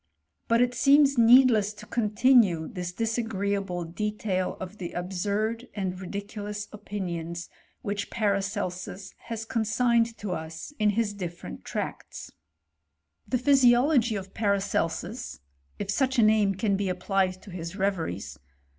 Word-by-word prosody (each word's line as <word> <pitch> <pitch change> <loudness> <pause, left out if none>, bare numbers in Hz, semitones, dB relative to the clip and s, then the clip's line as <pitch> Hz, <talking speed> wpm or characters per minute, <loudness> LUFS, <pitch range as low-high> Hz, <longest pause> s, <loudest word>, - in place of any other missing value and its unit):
But 230 +1 +4
it 245 0 0
seems 275 +2 +5
needless 230 -3 +6
to 210 - -12
continue 215 -6 +3
this 180 -5 -5
dis 225 +4 -1
agreeable 200 -5 -2
detaD 195 +1 -2
of 185 +3 -8
the 175 -2 -5
absurd 200 +6 -2
and 185 -2 -3
ridiculous 205 +2 -5
opinions 175 -5 -5 0.3
which 205 0 -3
Paracelsus 195 -2 -2
has 225 -1 -4
consigned 230 +1 +1
to 205 -2 -5
us 160 - -6
in 210 -1 +4
his 220 -3 +1
different 175 -3 -7
tracts. - - -5 1.0
The 255 - +1
Physiology 250 -2 +4
of 195 -1 -6
Paracelsus 200 0 -1 0.4
(if 200 -1 -3
such 265 +4 +1
a 235 - +6
name 215 -2 +4
can 200 0 0
he 200 -2 0
applied 185 0 0
to 200 - -11
his 170 0 -6
reveries). 185 - -2
205 Hz, 130 wpm, -27 LUFS, 185-230 Hz, 1.0 s, needless